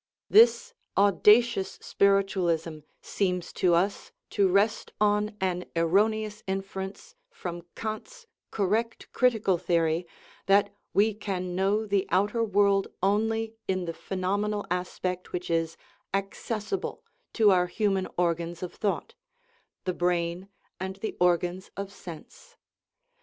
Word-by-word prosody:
This 475 Hz, +2 st, +6 dB, 0.2 s
audacious 205 Hz, +2 st, +4 dB
spiritual 195 Hz, -2 st, +2 dB
ism 160 Hz, -2 st, -2 dB, 0.2 s
seems 180 Hz, -3 st, -1 dB
to 175 Hz, -2 st, +3 dB
us 190 Hz, +4 st, 0 dB, 0.2 s
to 200 Hz, -1 st, +3 dB
rest 200 Hz, +4 st, +1 dB
on 210 Hz, 0 st, +1 dB
an 180 Hz, -1 st, -1 dB
erroneous 210 Hz, +5 st, +1 dB
inference 195 Hz, -, -5 dB, 0.2 s
from 175 Hz, -, -6 dB
Kant's 230 Hz, -, -6 dB, 0.2 s
correct 220 Hz, +4 st, -1 dB
critical 220 Hz, -8 st, +2 dB
theory, 170 Hz, -1 st, +1 dB, 0.4 s
that 200 Hz, +1 st, +4 dB, 0.2 s
we 210 Hz, +2 st, +3 dB
can 185 Hz, -4 st, -4 dB
know 200 Hz, +4 st, +1 dB
the 200 Hz, -2 st, 0 dB
outer 205 Hz, +5 st, +2 dB
world 200 Hz, -2 st, +3 dB, 0.2 s
only 220 Hz, +3 st, +1 dB
in 185 Hz, -1 st, -1 dB
the 165 Hz, -, -3 dB
phenomenal 200 Hz, +4 st, -2 dB
aspect 180 Hz, 0 st, -3 dB
which 180 Hz, -1 st, -3 dB
is 165 Hz, 0 st, 0 dB, 0.4 s
accessible 210 Hz, -, -3 dB, 0.3 s
to 215 Hz, -3 st, +5 dB
our 180 Hz, -1 st, +3 dB
human 195 Hz, -1 st, 0 dB
organs 170 Hz, 0 st, -1 dB
of 180 Hz, -, -5 dB
thought 205 Hz, -3 st, -2 dB, 0.7 s
the 185 Hz, -, -1 dB
brain 175 Hz, +1 st, -1 dB, 0.3 s
and 190 Hz, +1 st, -4 dB
the 205 Hz, +3 st, -5 dB
organs 180 Hz, +1 st, +1 dB
of 200 Hz, 0 st, -5 dB
sense. 200 Hz, -, -12 dB
195 Hz, 120 wpm, -27 LUFS, 180-210 Hz, 0.7 s, This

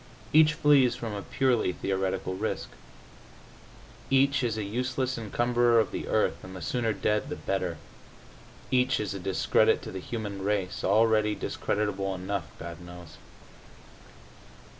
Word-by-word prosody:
Each 155 Hz, 0 st, +6 dB
flees 140 Hz, -6 st, +4 dB
from 115 Hz, -3 st, -5 dB
a 100 Hz, -, -4 dB
purely 125 Hz, -6 st, +1 dB
theoretical 95 Hz, -1 st, -2 dB
risk. 95 Hz, -, -3 dB, 1.4 s
Each 135 Hz, 0 st, +3 dB
is 115 Hz, -3 st, 0 dB
a 110 Hz, -, -2 dB
useless 130 Hz, +4 st, -2 dB
encumberer 120 Hz, +1 st, +2 dB
of 110 Hz, -, +1 dB
the -, -, -5 dB
earth, -, -, 0 dB
and 95 Hz, 0 st, -9 dB
the 90 Hz, -, -7 dB
sooner 120 Hz, -3 st, 0 dB
dead 105 Hz, +5 st, 0 dB
the 150 Hz, -, -3 dB
better. 90 Hz, -4 st, -2 dB, 0.9 s
Each 130 Hz, +1 st, +2 dB
is 105 Hz, -2 st, -2 dB
a 100 Hz, -, -5 dB
discredit 95 Hz, +1 st, +2 dB
to -, -, -7 dB
the 95 Hz, -, -5 dB
human 100 Hz, -1 st, -5 dB
race, 100 Hz, -1 st, -1 dB
already 110 Hz, +1 st, +3 dB
discreditable 100 Hz, -2 st, -2 dB
enough, 95 Hz, -2 st, -3 dB
God 85 Hz, +1 st, -8 dB
knows. 85 Hz, -2 st, -11 dB
105 Hz, 140 wpm, -28 LUFS, 95-125 Hz, 1.4 s, Each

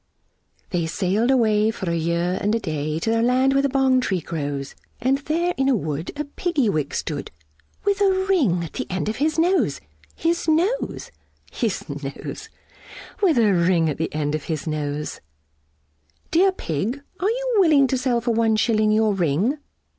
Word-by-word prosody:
They 170 Hz, -3 st, 0 dB
sailed 195 Hz, +7 st, 0 dB
away 220 Hz, -4 st, +3 dB
for 205 Hz, -4 st, -4 dB
a -, -, 0 dB
year 170 Hz, +2 st, 0 dB
and 210 Hz, +2 st, +1 dB
a -, -, 0 dB
day, 155 Hz, -5 st, -3 dB
To 225 Hz, -, 0 dB
the 225 Hz, 0 st, +2 dB
land 255 Hz, +3 st, +3 dB
where 275 Hz, -, +3 dB
the 280 Hz, -, +1 dB
Bong 265 Hz, -1 st, +3 dB
tree 190 Hz, -6 st, 0 dB
grows, 145 Hz, -4 st, -4 dB, 0.3 s
And 260 Hz, +3 st, +1 dB
there 335 Hz, +5 st, 0 dB
in 270 Hz, 0 st, +2 dB
a 265 Hz, -, +4 dB
wood 155 Hz, -4 st, -3 dB
a -, -, 0 dB
Piggy 285 Hz, -, 0 dB
wig 150 Hz, -6 st, -1 dB
stood, 145 Hz, -3 st, -3 dB, 0.6 s
With 405 Hz, 0 st, +1 dB
a 400 Hz, -, +5 dB, 0.2 s
ring 245 Hz, -, +2 dB
at 165 Hz, -, -8 dB
the -, -, -4 dB
end 185 Hz, +3 st, -2 dB
of 215 Hz, -, -3 dB
his 310 Hz, +3 st, 0 dB
nose, 355 Hz, +3 st, +2 dB, 0.4 s
His 335 Hz, +1 st, -1 dB
nose, 350 Hz, +10 st, 0 dB, 0.4 s
His 225 Hz, -6 st, -2 dB
nose, 140 Hz, -2 st, -7 dB, 0.7 s
With 355 Hz, -9 st, +3 dB
a 215 Hz, -4 st, +4 dB
ring 170 Hz, -2 st, +2 dB
at 145 Hz, -, -6 dB
the 160 Hz, -, -1 dB
end 150 Hz, -1 st, -2 dB
of 155 Hz, -2 st, -3 dB
his 155 Hz, -3 st, -3 dB
nose. 150 Hz, -1 st, -3 dB, 1.1 s
"Dear 375 Hz, +4 st, +4 dB
Pig, 230 Hz, -, -3 dB, 0.2 s
are 385 Hz, -, +1 dB
you -, -, -1 dB
willing 310 Hz, -7 st, +5 dB
to 260 Hz, 0 st, 0 dB
sell 245 Hz, -2 st, +1 dB
for 235 Hz, +1 st, 0 dB
one 225 Hz, -1 st, +2 dB
shilling 215 Hz, -1 st, +2 dB
Your 215 Hz, -1 st, +3 dB
ring?" 190 Hz, -, 0 dB
220 Hz, 180 wpm, -23 LUFS, 165-280 Hz, 1.1 s, a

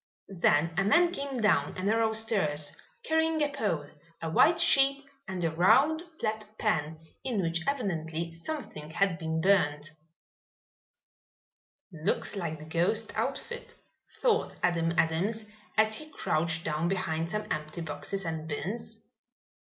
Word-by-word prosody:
Then 160 Hz, 0 st, +3 dB
a 195 Hz, -, +3 dB
man 340 Hz, -, +4 dB
came 280 Hz, -5 st, -4 dB
down 210 Hz, -3 st, +2 dB
a 185 Hz, -, -4 dB
narrow 220 Hz, +2 st, +2 dB
stairs, 155 Hz, -10 st, +1 dB, 0.3 s
carrying 320 Hz, 0 st, +1 dB
a 295 Hz, -, +1 dB
pole, 195 Hz, -, -1 dB, 0.3 s
a 165 Hz, -1 st, -4 dB
white 330 Hz, -, +5 dB
sheet 275 Hz, -4 st, +4 dB, 0.2 s
and 185 Hz, -3 st, -4 dB
a 165 Hz, -, +1 dB
round, 245 Hz, -, +4 dB, 0.2 s
flat 215 Hz, 0 st, -1 dB
pan 160 Hz, -7 st, 0 dB, 0.2 s
in 240 Hz, -6 st, -1 dB
which 165 Hz, -2 st, 0 dB
evidently 170 Hz, -, -2 dB
something 165 Hz, -, -6 dB
had 180 Hz, +1 st, +1 dB
been 160 Hz, -1 st, -2 dB
burnt. 155 Hz, -6 st, +2 dB, 2.0 s
"Looks 160 Hz, +5 st, -1 dB
like 165 Hz, -5 st, -3 dB
the 155 Hz, -, -11 dB
ghost 175 Hz, +8 st, +1 dB
outfit," 480 Hz, 0 st, -4 dB, 0.5 s
thought 465 Hz, -2 st, +2 dB
Adam 165 Hz, -2 st, +2 dB
Adams, 195 Hz, +8 st, +1 dB, 0.3 s
as 220 Hz, 0 st, +4 dB
he 310 Hz, -, -9 dB
crouched 165 Hz, -, 0 dB
down 155 Hz, +2 st, 0 dB
behind 165 Hz, -3 st, -1 dB
some 210 Hz, +2 st, -2 dB
empty 155 Hz, +3 st, -3 dB
boxes 165 Hz, +5 st, -4 dB
and 160 Hz, -1 st, -4 dB
bins. 220 Hz, +8 st, -5 dB
185 Hz, 135 wpm, -29 LUFS, 160-225 Hz, 2.0 s, white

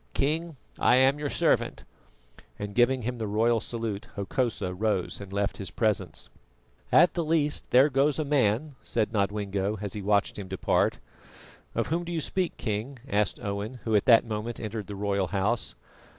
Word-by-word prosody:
King, 160 Hz, +2 st, 0 dB, 0.2 s
I -, -, +5 dB
am 135 Hz, +3 st, +4 dB
your 145 Hz, -1 st, -2 dB
servant," -, -, +1 dB, 0.7 s
and 105 Hz, 0 st, -5 dB
giving 125 Hz, +2 st, +3 dB
him 125 Hz, +1 st, -3 dB
the 110 Hz, -, -2 dB
royal 115 Hz, +3 st, +2 dB
salute, 115 Hz, -1 st, -4 dB
Hokosa 100 Hz, -2 st, -1 dB
rose 100 Hz, -1 st, -1 dB
and 100 Hz, -1 st, -9 dB
left 100 Hz, +1 st, -1 dB
his 95 Hz, -, -5 dB
presence. 100 Hz, -7 st, -1 dB, 0.6 s
"At 175 Hz, +2 st, +6 dB
the 170 Hz, -, -1 dB
least 155 Hz, -2 st, 0 dB
there 130 Hz, +3 st, +6 dB
goes 140 Hz, 0 st, +2 dB
a 155 Hz, -, -1 dB
man," 140 Hz, 0 st, +1 dB
said 110 Hz, -2 st, -1 dB
Nodwengo, 100 Hz, 0 st, -1 dB
as 100 Hz, -2 st, -4 dB
he 105 Hz, -, -4 dB
watched 100 Hz, +1 st, +1 dB
him 100 Hz, -, -6 dB
depart. -, -, +1 dB, 0.8 s
"Of -, -, 0 dB
whom 170 Hz, +3 st, 0 dB
do 175 Hz, -, -6 dB
you 170 Hz, -, -1 dB
speak, 180 Hz, +3 st, -1 dB
King?" 110 Hz, +4 st, -3 dB
asked 105 Hz, -6 st, 0 dB
Owen, 100 Hz, +4 st, -3 dB
who 110 Hz, -2 st, +1 dB
at 105 Hz, -, +3 dB
that 120 Hz, -3 st, +6 dB
moment 110 Hz, +1 st, -4 dB
entered 110 Hz, -2 st, -5 dB
the 100 Hz, -, -6 dB
royal 100 Hz, -1 st, 0 dB
house. 100 Hz, -2 st, 0 dB
110 Hz, 175 wpm, -27 LUFS, 100-135 Hz, 0.8 s, At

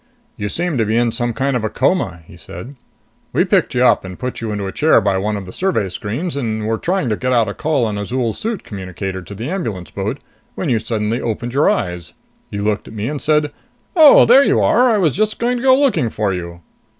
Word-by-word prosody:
"You 105 Hz, -2 st, -4 dB
seemed 170 Hz, 0 st, -1 dB
to 110 Hz, -, +2 dB
be 110 Hz, +2 st, 0 dB
in 120 Hz, -1 st, +2 dB
some 120 Hz, +1 st, -1 dB
kind 130 Hz, +4 st, -1 dB
of 125 Hz, -, 0 dB
coma," 90 Hz, -, 0 dB
he 85 Hz, -, -15 dB
said. 95 Hz, +10 st, -10 dB, 0.6 s
"We -, -, +3 dB
picked -, -, +1 dB
you -, -, +3 dB
up -, -, +4 dB
and 95 Hz, -1 st, -8 dB
put 125 Hz, -2 st, -5 dB
you 115 Hz, -2 st, -3 dB
into 105 Hz, -1 st, -3 dB
a 95 Hz, -, -4 dB
chair 155 Hz, +8 st, +4 dB
by 95 Hz, -1 st, 0 dB
one 105 Hz, +2 st, -1 dB
of 100 Hz, -, -7 dB
the 90 Hz, -, -10 dB
survey 185 Hz, -, 0 dB
screens, 115 Hz, -, -4 dB
and 110 Hz, -5 st, -2 dB
were 110 Hz, 0 st, -1 dB
trying 185 Hz, -5 st, -1 dB
to 105 Hz, -, +1 dB
get 130 Hz, +4 st, -2 dB
out 115 Hz, -3 st, +3 dB
a 100 Hz, -, -3 dB
call 150 Hz, -3 st, 0 dB
on 105 Hz, -2 st, -3 dB
Azol's 115 Hz, +2 st, -2 dB
suit 225 Hz, -2 st, -3 dB
communicator 95 Hz, -1 st, -6 dB
to 100 Hz, +3 st, -10 dB
the 115 Hz, +5 st, -5 dB
ambulance 115 Hz, -, -4 dB
boat 105 Hz, +7 st, -3 dB, 0.4 s
when 170 Hz, -, -3 dB
you 115 Hz, -3 st, +2 dB
suddenly 110 Hz, +1 st, -2 dB
opened 120 Hz, +1 st, -3 dB
your 140 Hz, +3 st, +3 dB
eyes. 90 Hz, -5 st, -2 dB, 0.4 s
You 100 Hz, 0 st, -4 dB
looked 105 Hz, 0 st, -1 dB
at 110 Hz, -, -11 dB
me 105 Hz, +1 st, -3 dB
and 150 Hz, -1 st, -4 dB
said, 150 Hz, -1 st, +2 dB, 0.4 s
'Oh, 315 Hz, -4 st, +8 dB
there 260 Hz, +4 st, +7 dB
you -, -, +2 dB
are! 250 Hz, +1 st, +4 dB
I 220 Hz, -, +3 dB
was 165 Hz, -8 st, +1 dB
just 215 Hz, +1 st, 0 dB
going 245 Hz, +1 st, 0 dB
to 240 Hz, -, -5 dB
go 260 Hz, 0 st, +6 dB
looking 260 Hz, -, +2 dB
for 105 Hz, -2 st, -1 dB
you.'" 85 Hz, -1 st, -6 dB
115 Hz, 240 wpm, -18 LUFS, 100-155 Hz, 0.6 s, Oh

